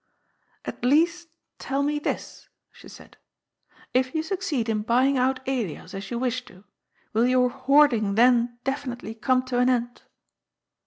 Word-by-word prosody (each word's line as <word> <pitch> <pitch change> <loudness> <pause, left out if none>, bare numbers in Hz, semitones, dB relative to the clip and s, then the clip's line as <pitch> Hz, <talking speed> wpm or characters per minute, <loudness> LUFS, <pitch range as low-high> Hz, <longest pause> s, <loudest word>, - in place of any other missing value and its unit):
^' - - -44 0.3
At - - -7
least 330 +6 +2 0.3
tell 275 +1 -1
me 295 +1 0
this," - - -5 0.2
she - - -16
said. - - -15 0.8
"If 255 +3 +1
you 315 - 0
succeed 325 - -2
in 215 -1 0
buying 250 +5 +2
out 260 0 0
Elias, 235 - -3
as 195 0 -6
you 235 - -3
wish 250 0 -1
to, 190 0 -17 0.5
will 230 +3 +3
your 250 -1 +3
hoarding 260 -6 +3
then 240 0 +3
definitely 255 -4 -4
come 255 +3 +1
to 250 -1 -1
an 250 +1 +3
end 240 -1 -1
255 Hz, 155 wpm, -25 LUFS, 235-275 Hz, 0.8 s, will